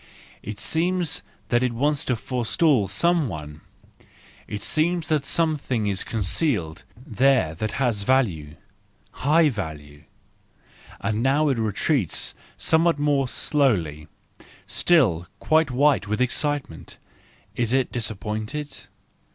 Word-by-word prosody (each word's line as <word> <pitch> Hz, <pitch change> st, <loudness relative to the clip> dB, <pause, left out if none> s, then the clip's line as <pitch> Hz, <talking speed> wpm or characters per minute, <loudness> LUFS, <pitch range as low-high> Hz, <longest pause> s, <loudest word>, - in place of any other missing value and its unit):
It 105 Hz, 0 st, -7 dB
seems 170 Hz, -, 0 dB, 0.3 s
that 120 Hz, 0 st, +2 dB
it 125 Hz, -2 st, 0 dB
wants 145 Hz, +4 st, +1 dB
to 125 Hz, -, +1 dB
forestall 125 Hz, -, +1 dB
some 170 Hz, -, +2 dB
one; 75 Hz, -5 st, -8 dB, 0.9 s
it 105 Hz, -1 st, -5 dB
seems 165 Hz, +1 st, 0 dB
that 155 Hz, -2 st, +2 dB
some¬ 160 Hz, -1 st, +1 dB
thing 120 Hz, -6 st, -2 dB
is 100 Hz, -2 st, 0 dB
concealed 105 Hz, -, -1 dB
there 125 Hz, -, +1 dB
that 105 Hz, +6 st, -4 dB
has 120 Hz, -6 st, 0 dB
value, 100 Hz, -, 0 dB, 0.6 s
high 155 Hz, +3 st, +3 dB
value. 75 Hz, -, -7 dB, 1.0 s
—And 105 Hz, +2 st, -1 dB
now 145 Hz, +4 st, +2 dB
it 130 Hz, -4 st, 0 dB
retreats 110 Hz, -, 0 dB, 0.2 s
somewhat 165 Hz, 0 st, +2 dB
more 145 Hz, -2 st, +1 dB
slowly, 90 Hz, -, 0 dB, 0.6 s
still 105 Hz, -, +2 dB
quite 160 Hz, -1 st, +2 dB
white 135 Hz, -3 st, +2 dB
with 105 Hz, +2 st, -1 dB
excitement,—is 125 Hz, -, -4 dB
it 130 Hz, 0 st, +1 dB
disappointed? 110 Hz, +5 st, -4 dB
125 Hz, 110 wpm, -24 LUFS, 100-150 Hz, 1.0 s, high